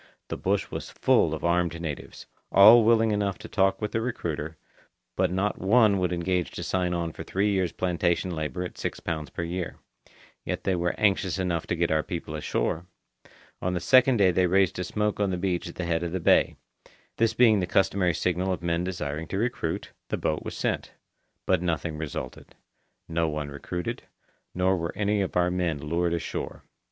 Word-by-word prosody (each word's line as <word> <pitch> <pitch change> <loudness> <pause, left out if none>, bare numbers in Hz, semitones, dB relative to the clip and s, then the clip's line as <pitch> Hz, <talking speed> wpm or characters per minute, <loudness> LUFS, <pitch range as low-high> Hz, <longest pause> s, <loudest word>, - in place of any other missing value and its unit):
The - - -2
bush 100 +1 -1
was - - -5
full - - +3
of - - -4
armed 85 -1 +1
natives; 80 -4 -6 0.3
all 110 +4 +9
willing 115 0 +4
enough 100 -2 0
to - - -10
talk 95 -1 +2
with 105 - -3
the 115 - 0
recruiter, 80 -9 -3 0.6
but - - +1
not 95 +3 -1
one 105 0 +4
would 90 -1 0
engage 90 0 0
to - - -5
sign 90 -1 0
on 85 -1 -2
for - - -9
three 100 +2 0
years' 95 -4 +1
plantation 90 0 0
labour 80 0 -3
at 90 - -8
six - - -3
pounds 80 -4 -4
per 85 - -4
year. 85 0 -4 0.7
Yet - - -3
they 95 - +1
were 85 0 0
anxious 95 -3 +2
enough 90 -3 -1
to - - 0
get 85 -1 0
our 80 0 +3
people 85 -2 -5
ashore. 80 +3 -2 0.7
On 90 0 -1
the - - 0
second 130 +5 +5
day 95 -3 +5
they 90 +1 +2
raised 95 0 +2
a - - -1
smoke 105 +3 -1
on 100 -1 +2
the 90 - -1
beach 90 -1 -1
at - - -10
the 90 - -3
head 85 -1 0
of 85 0 -3
the 95 - -1
bay. 85 - +4 0.6
This 115 -1 +2
being 110 -4 +5
the 90 - -1
customary 90 -2 +2
signal 90 +1 0
of 90 -2 -3
men 85 0 0
desiring 80 -4 -4
to 95 - -3
recruit, 110 -7 -2 0.2
the - - -1
boat 75 - -1
was - - -6
sent. - - -2 0.5
But 95 -2 +2
nothing 85 -2 -1
resulted. 70 -5 -6 0.5
No 80 0 0
one 75 -1 -3
recruited, 90 +5 -5 0.5
nor 90 +1 +2
were 85 -1 -3
any 105 0 +1
of 95 - -2
our 90 0 +2
men 90 -4 0
lured 85 +4 -1
ashore. 85 - -5
90 Hz, 195 wpm, -27 LUFS, 85-95 Hz, 0.7 s, all